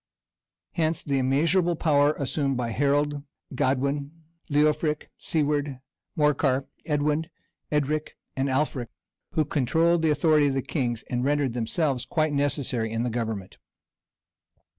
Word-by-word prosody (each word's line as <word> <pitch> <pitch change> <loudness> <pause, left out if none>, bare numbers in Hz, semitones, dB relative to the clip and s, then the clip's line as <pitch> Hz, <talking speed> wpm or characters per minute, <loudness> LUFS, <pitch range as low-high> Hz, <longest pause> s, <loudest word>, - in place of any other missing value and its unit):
Hence 160 0 0
the 140 -2 0
immeasurable 165 +7 +2
power 150 -2 +3
assumed 140 -1 -1
by 120 -2 -2
Harold, 145 +3 +1 0.3
Godwin, 140 +4 -1 0.3
Leofric, 150 +1 +1
Siward, 145 -3 0 0.4
Morcar, 140 -3 +2 0.2
Edwin, 150 +1 +1 0.4
Edric, 150 +1 -1 0.2
and 135 +1 0
Alfric 130 -3 0 0.5
who 155 - +2
controlled 160 +5 +2
the 160 - +2
authority 150 0 +4
of 135 - 0
the 135 - 0
kings, 120 -6 -2
and 125 0 -1
rendered 140 -2 +1
themselves 125 +3 -1
quite 155 -2 +1
necessary 135 -5 0
in 115 +1 -1
the 125 - -1
government. 110 -5 -4
145 Hz, 120 wpm, -26 LUFS, 130-155 Hz, 0.5 s, authority